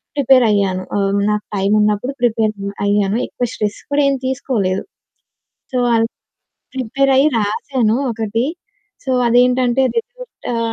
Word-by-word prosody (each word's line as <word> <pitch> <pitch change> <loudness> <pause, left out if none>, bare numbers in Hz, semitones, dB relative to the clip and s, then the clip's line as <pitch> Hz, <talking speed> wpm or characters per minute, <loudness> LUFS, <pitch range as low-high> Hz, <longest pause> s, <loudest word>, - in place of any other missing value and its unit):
ప్రిపేరయ్యాను. 215 -9 +3
ఆహ్, 200 0 +1
నాకు 210 0 -2
టైమున్నప్పుడు 210 +5 +1
ప్రిపేరయ్యాను. 205 -2 0
ఎక్కువ 245 - -3
స్ట్రెస్ 210 -1 -3
కూడా 285 0 +3
ఏం 275 - +1
తీసుకోలేదు. 235 -8 -1 0.9
సో, 255 - 0 0.2
అల్ 225 0 +3 0.7
ప్రిపేరయ్యి 270 +3 +2
రాసాను 220 +2 0 0.2
ఒకటి. 225 +1 -2 0.6
సో, - - -1 0.2
అదేంటంటే 250 +1 +3
రిజల్టు 485 +2 -4 0.3
ఆహ్, 230 -1 -1
225 Hz, 105 wpm, -18 LUFS, 205-260 Hz, 0.9 s, ప్రిపేరయ్యాను